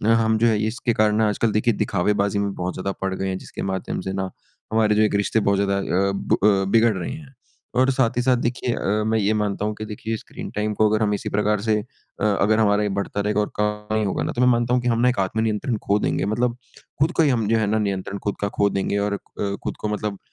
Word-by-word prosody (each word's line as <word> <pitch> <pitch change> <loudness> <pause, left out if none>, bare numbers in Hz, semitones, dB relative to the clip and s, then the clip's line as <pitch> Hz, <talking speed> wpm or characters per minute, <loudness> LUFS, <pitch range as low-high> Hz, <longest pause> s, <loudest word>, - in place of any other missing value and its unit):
हम 110 -1 +2
जो 115 - +3
है 110 -2 +3
इसके 120 +1 -1
कारण 110 0 +2
आजकल 110 +1 +1
देखिए 110 +2 +2
दिखावे-बाज़ी 100 +2 0
में 100 -1 -1
बहुत 90 0 -3
ज़्यादा 95 +1 -3
पड़ 95 0 -1
गए 95 +1 -3
हैं 95 -1 -2
जिसके - - -8
माध्यम 95 -1 -3
से 95 +1 -4
ना 95 -1 -2 0.4
हमारे 110 -1 +3
जो 105 - +3
एक 105 - +1
रिश्ते 100 +2 +1
बहुत 100 -2 +2
ज़्यादा 100 0 +1
अ, 100 0 +1
ब 100 - 0
अ, 100 -2 +4
बिगड़ 115 0 +4
रहे 90 - -4
हैं। 145 -1 -10 0.4
और 130 +2 +4
साथ 130 -3 +1
ही - - +3
साथ 125 0 +3
देखिए 120 0 -1
अ, 105 +2 0
मैं 110 0 +2
ये 105 +1 +2
मानता 105 0 -1
हूँ 105 0 -2
कि 110 - -5
देखिए 110 +1 -4
स्क्रीन - - -9
टाइम 105 0 -1
को 110 0 +3
अगर 110 +1 +1
हम 105 -1 +1
इसी 100 - -3
प्रकार 105 0 +1
से 110 -1 +1
अ, 105 - -12
अगर 105 +1 +2
हमारे 105 -1 +3
बढ़ता 100 - -3
रहेगा 105 +1 0
और 105 - -3
कम 105 0 -1
नहीं 110 -1 +1
होगा 95 - -1
ना - - -2
तो 120 - -2
मैं 125 - +5
मानता 120 0 +2
हूँ 125 - +3
कि 125 - -3
हम 115 -1 +2
ना 125 - +5
एक 125 - -1
आत्म-नियंत्रण 110 +4 0
खो 100 +1 +3
देंगे - - 0
मतलब 120 +4 0 0.4
खुद 155 +4 +3
को 165 - +5
ही 150 - +3
हम 115 -5 +1
जो 115 +1 +3
है 110 -2 +1
ना 110 +1 +1
नियंत्रण 100 -1 -2
खुद 100 - -1
का 100 - +1
खो 100 0 +4
देंगे। 100 +1 -1
और 100 0 -1 0.5
खुद - - -4
को 105 - -2
मतलब 105 -1 -3
105 Hz, 260 wpm, -23 LUFS, 100-115 Hz, 0.5 s, मैं